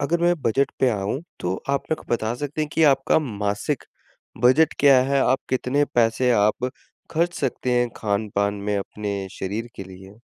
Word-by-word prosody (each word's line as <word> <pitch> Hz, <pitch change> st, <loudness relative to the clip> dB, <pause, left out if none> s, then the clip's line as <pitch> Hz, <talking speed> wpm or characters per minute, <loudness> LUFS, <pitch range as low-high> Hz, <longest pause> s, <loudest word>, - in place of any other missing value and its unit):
अगर 165 Hz, +4 st, 0 dB
मैं 175 Hz, 0 st, +4 dB
बजट 135 Hz, +4 st, +1 dB
पे 130 Hz, -, +4 dB
आऊँ, 105 Hz, +6 st, -2 dB, 0.2 s
तो 90 Hz, +1 st, -1 dB
आप 140 Hz, -, 0 dB
मेरे -, -, +3 dB
को -, -, -22 dB
बता 110 Hz, +1 st, -2 dB
सकते 145 Hz, +4 st, -4 dB
हैं 150 Hz, -, -3 dB
कि 160 Hz, -, +1 dB
आपका 135 Hz, +3 st, +2 dB
मासिक 105 Hz, -7 st, -2 dB, 0.6 s
बजट 140 Hz, +6 st, +5 dB
क्या 140 Hz, -2 st, +6 dB
है? 135 Hz, +1 st, +1 dB
आप 130 Hz, +1 st, +3 dB
कितने 130 Hz, +3 st, +1 dB
पैसे 120 Hz, +2 st, +3 dB
आप 110 Hz, +4 st, +2 dB, 0.4 s
खर्च 170 Hz, +2 st, 0 dB
सकते 130 Hz, -2 st, -1 dB
हैं, 120 Hz, -, +1 dB
खान-पान 100 Hz, -1 st, -1 dB
में 100 Hz, 0 st, -2 dB
अपने 100 Hz, -1 st, -4 dB
शरीर 105 Hz, +5 st, -3 dB
के 95 Hz, -, -6 dB
लिए? 95 Hz, +2 st, -13 dB
120 Hz, 180 wpm, -23 LUFS, 100-140 Hz, 0.6 s, क्या